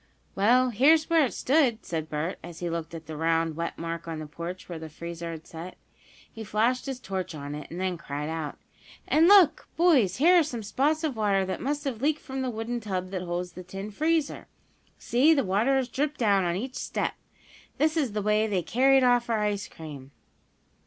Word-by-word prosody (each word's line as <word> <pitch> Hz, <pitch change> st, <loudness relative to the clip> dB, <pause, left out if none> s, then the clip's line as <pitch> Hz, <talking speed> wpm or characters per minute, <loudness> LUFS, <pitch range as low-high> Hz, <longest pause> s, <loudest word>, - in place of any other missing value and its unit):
"Well, 245 Hz, +5 st, +3 dB
here's 310 Hz, +8 st, +4 dB
where 325 Hz, -2 st, +5 dB
it 250 Hz, -, -3 dB
stood," 260 Hz, -5 st, +2 dB
said 160 Hz, -2 st, -4 dB
Bert, 155 Hz, +4 st, -3 dB
as 170 Hz, -1 st, -9 dB
he 175 Hz, 0 st, -3 dB
looked 165 Hz, 0 st, -4 dB
at 165 Hz, -1 st, -8 dB
the 155 Hz, +1 st, -7 dB
round, 165 Hz, 0 st, +1 dB
wet 170 Hz, +1 st, -4 dB
mark 165 Hz, 0 st, -5 dB
on 165 Hz, -1 st, -4 dB
the 155 Hz, -, -6 dB
porch 170 Hz, +4 st, -7 dB
where 170 Hz, -2 st, -6 dB
the 160 Hz, 0 st, -8 dB
freezer 170 Hz, +2 st, -7 dB
had 160 Hz, -1 st, -7 dB
set. 170 Hz, +3 st, -9 dB, 0.6 s
He 225 Hz, -, -7 dB
flashed 230 Hz, +5 st, 0 dB
his 265 Hz, -2 st, -4 dB
torch 185 Hz, -6 st, -4 dB
on 145 Hz, -1 st, -6 dB
it, 150 Hz, 0 st, -7 dB
and 170 Hz, -, -7 dB
then 185 Hz, -2 st, -2 dB
cried 145 Hz, -2 st, -5 dB
out: 160 Hz, -2 st, -4 dB, 0.5 s
"And 320 Hz, +2 st, +5 dB
look, 365 Hz, -6 st, +6 dB
boys, 280 Hz, -, +4 dB
here 345 Hz, -, +6 dB
are -, -, +4 dB
some 240 Hz, -7 st, -5 dB
spots 285 Hz, +10 st, 0 dB
of 300 Hz, -5 st, -1 dB
water 200 Hz, -3 st, +1 dB
that 185 Hz, -, -4 dB
must 290 Hz, +2 st, -2 dB
have 255 Hz, -6 st, -4 dB
leaked 300 Hz, +2 st, +1 dB
from 265 Hz, 0 st, -5 dB
the 260 Hz, -, -1 dB
wooden 235 Hz, +1 st, -3 dB
tub 185 Hz, -4 st, -4 dB
that 185 Hz, -2 st, -3 dB
holds 180 Hz, 0 st, -3 dB
the 180 Hz, -, -9 dB
tin 195 Hz, +3 st, -7 dB
freezer. 315 Hz, +6 st, 0 dB, 0.5 s
See, 285 Hz, +7 st, +3 dB
the 275 Hz, -, +2 dB
water 215 Hz, +8 st, +2 dB
has 265 Hz, -2 st, +1 dB
dripped 295 Hz, +4 st, -2 dB
down 200 Hz, -5 st, +3 dB
on 170 Hz, 0 st, 0 dB
each 250 Hz, +7 st, -4 dB
step! -, -, -2 dB, 0.6 s
This 310 Hz, +2 st, +2 dB
is 275 Hz, -9 st, 0 dB
the 210 Hz, -1 st, -2 dB
way 210 Hz, +1 st, +2 dB
they 190 Hz, -4 st, 0 dB
carried 265 Hz, +6 st, +4 dB
off 245 Hz, -1 st, +3 dB
our 225 Hz, -2 st, +1 dB
ice 205 Hz, -2 st, -1 dB
cream." 145 Hz, -4 st, -10 dB
210 Hz, 215 wpm, -27 LUFS, 170-265 Hz, 0.6 s, look